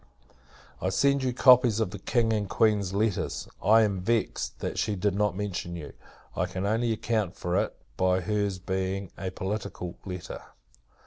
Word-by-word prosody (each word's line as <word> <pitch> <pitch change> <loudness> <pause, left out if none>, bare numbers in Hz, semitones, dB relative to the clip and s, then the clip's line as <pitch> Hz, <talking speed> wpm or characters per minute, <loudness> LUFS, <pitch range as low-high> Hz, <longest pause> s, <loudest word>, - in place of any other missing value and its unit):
I 95 - +1
send 140 +8 +3
you 130 -1 0
copies 125 -3 +6
of 110 -5 0
the 100 - -7
King 115 +2 +1
and 105 -3 -1
Queen's 105 -4 +2
letters. 105 0 -1
I 110 +1 +6
am 100 -3 0
vexed, 115 +2 -1
that - - -3
she 105 -1 0
did 100 +1 0
not 100 -2 0
mention 90 -4 -3
you! 75 -4 -8 0.4
I - - 0
can 95 +1 -4
only 115 +3 +1
account 110 -4 -1
for 90 0 -2
it, - - -4 0.2
by 95 0 +2
her's 100 -1 -1
being 95 0 -3
a 95 - -4
political 95 -2 -4
letter. 90 -2 -6
100 Hz, 170 wpm, -28 LUFS, 95-110 Hz, 0.4 s, copies